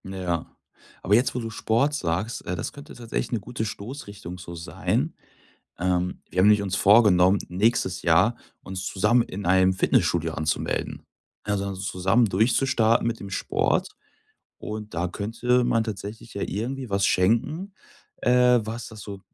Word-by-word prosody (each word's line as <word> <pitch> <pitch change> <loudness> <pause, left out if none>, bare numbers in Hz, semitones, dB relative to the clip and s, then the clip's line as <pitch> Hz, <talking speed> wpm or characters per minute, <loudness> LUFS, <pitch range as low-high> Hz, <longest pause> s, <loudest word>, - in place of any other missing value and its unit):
Ja, 90 -3 -4 0.5
aber 100 - +1
jetzt, 120 +4 +3
wo - - -1
du 115 -1 -5
Sport 115 +7 +1
sagst, 95 - -2
äh, 90 - -2
das 85 - -5
könnte 145 +1 -11
tatsächlich 115 0 -4
'ne 120 - 0
gute 110 +2 -5
Stoßrichtung 100 -5 -7
so 85 -1 -8
sein. 85 0 -2 0.7
Ähm, 90 0 -1
wir 90 - -2
haben 95 - +6
nämlich 105 -1 +5
uns 95 -1 -2
vorgenommen, 100 -2 +5
nächstes 95 0 +1
Jahr 90 +8 +3 0.3
uns 95 0 -5
zusammen 120 +6 +2
in 100 -2 -7
einem 95 +1 +4
Fitnessstudio 95 - +1
anzumelden, 75 +1 -2 0.4
also 100 -1 -2
zusammen 95 +4 +1
durchzustarten 115 +3 +2
mit 115 -1 -2
dem 100 - -8
Sport. 95 - 0 0.7
Und 105 -2 -7
da 85 +2 -1
könnte 115 +6 0
man 115 -1 +2
tatsächlich 110 0 -7
ja 100 - -3
irgendwie 125 +5 -4
was 100 0 +1
schenken, 135 - +1 0.4
äh, 125 0 +4
was 115 +2 -5
das 110 -2 -11
so 100 -1 -8
105 Hz, 150 wpm, -25 LUFS, 95-115 Hz, 0.7 s, haben